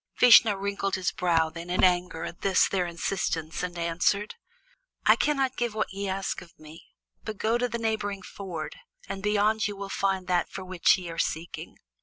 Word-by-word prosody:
Vishnu 230 -3 +8
wrinkled 195 0 -2
his 185 -1 -1
brows 165 -3 +1
then 170 +1 -8
in 180 - +1
anger 180 -2 +2
at 170 - -7
this 195 -2 +4
their 185 -2 0
insistence, 165 -2 -2
and 175 -1 -4
answered: 170 +5 0 0.7
"I - - +7
cannot 270 -3 0
give 240 -3 -1
what 215 -3 -2
ye 200 0 -3
ask 195 0 -2
of 170 -2 -16
me, 155 +1 -13 0.4
but 215 -2 -5
go 225 +3 +1
to 245 0 0
the 235 - -2
neighboring 210 -4 -2
ford, 175 -7 -7 0.3
and 195 - -5
beyond 210 +2 +2
ye 205 - -5
will 200 0 -6
find 195 -1 0
that 180 -1 +1
for 190 - -7
which 185 0 +3
ye 180 -2 -7
are 165 - -6
seeking." 165 +2 -3
195 Hz, 190 wpm, -27 LUFS, 175-210 Hz, 0.7 s, Vishnu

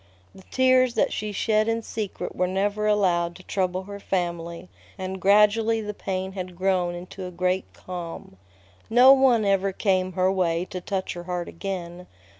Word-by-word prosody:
The - - -14
tears 255 -1 +3
that - - +1
she 215 0 -3
shed 215 +2 +1
in 230 0 0
secret 215 -3 -5
were 180 - +1
never 205 +3 0
allowed 175 -5 +2
to 185 - -13
trouble 185 -1 -1
her 200 +1 -8
family, 170 -2 -3 0.3
and 190 0 -5
gradually 210 +3 +4
the 210 -1 -4
pain 190 -1 -4
had 185 -2 -6
grown 180 -1 0
into 180 +1 -8
a - - -6
great 180 +1 -1
calm. 170 - -8 0.5
No 250 +4 +8
one 255 -5 +4
ever 195 0 +2
came 185 -1 0
her 185 +1 +2
way 175 -2 0
to 185 - -5
touch 190 0 -3
her 175 0 -8
heart 180 -1 -3
again. 180 -1 -6
190 Hz, 170 wpm, -25 LUFS, 180-210 Hz, 0.5 s, No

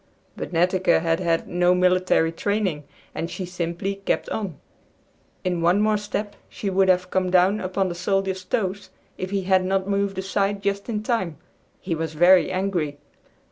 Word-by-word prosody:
But - - -6
Netteke 180 +2 +3
had 165 -1 0
had 170 -2 0
no 175 +1 +3
military 180 -2 +3
training, 185 -4 -1 0.3
and 165 - -3
she 185 - -5
simply 180 +2 -3
kept - - 0
on. 195 -9 -4 0.9
In 180 -2 -1
one 175 +4 +3
more 215 0 +3
step 205 0 -4
she 200 - -4
would 190 0 +3
have 180 0 +2
come 185 -1 +1
down 185 +3 +4
upon 190 0 -1
the 175 - -3
soldier's 190 +1 -1
toes, 195 0 -2 0.3
if 185 - -3
he 195 -1 -1
had 190 0 +3
not 190 +1 0
moved 200 -1 0
aside 195 +1 -1
just 200 +2 -2
in 215 -2 -2
time. 190 - -1 0.4
He 180 - -3
was 160 -1 -3
very 180 +3 +6
angry. 185 -6 -1
185 Hz, 170 wpm, -23 LUFS, 175-200 Hz, 0.9 s, very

